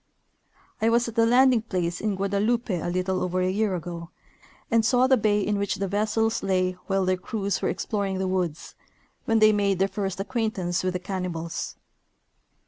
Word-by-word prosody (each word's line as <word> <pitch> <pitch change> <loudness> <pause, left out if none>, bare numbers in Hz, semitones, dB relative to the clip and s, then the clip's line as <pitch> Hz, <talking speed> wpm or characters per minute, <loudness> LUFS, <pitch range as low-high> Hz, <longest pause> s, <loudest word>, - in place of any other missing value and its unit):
I 225 - +3
was 235 +1 +2
at 230 - -5
the 230 0 +3
landing 250 0 +5
place 180 -5 -2
in 215 -2 0
Guadeloupe 205 +4 0
a 175 -2 -2
little. 185 +1 -1
over 180 0 -1
a 185 0 +1
year 205 -1 0
ago, 170 0 -6 0.6
and 230 -1 +4
saw 250 +2 +4
the 260 0 +5
bay 210 -3 +2
in 205 0 0
which 200 -1 -1
the 195 - -2
vessels 215 +3 0
lay 185 -1 +1 0.2
while 195 -1 +1
their 185 0 +1
crews 200 +1 -3
were - - 0
ex - - -3
ploring 200 -3 -1
the 190 0 -1
woods, 180 -4 -2 0.5
when 225 - +2
they 215 0 +6
made 200 -2 +1
their 190 +2 +2
first 195 -1 -4
acquaintance 195 -5 -1
with 185 0 0
the 180 - -2
cannibals. 180 -3 -4
195 Hz, 190 wpm, -25 LUFS, 185-220 Hz, 0.6 s, they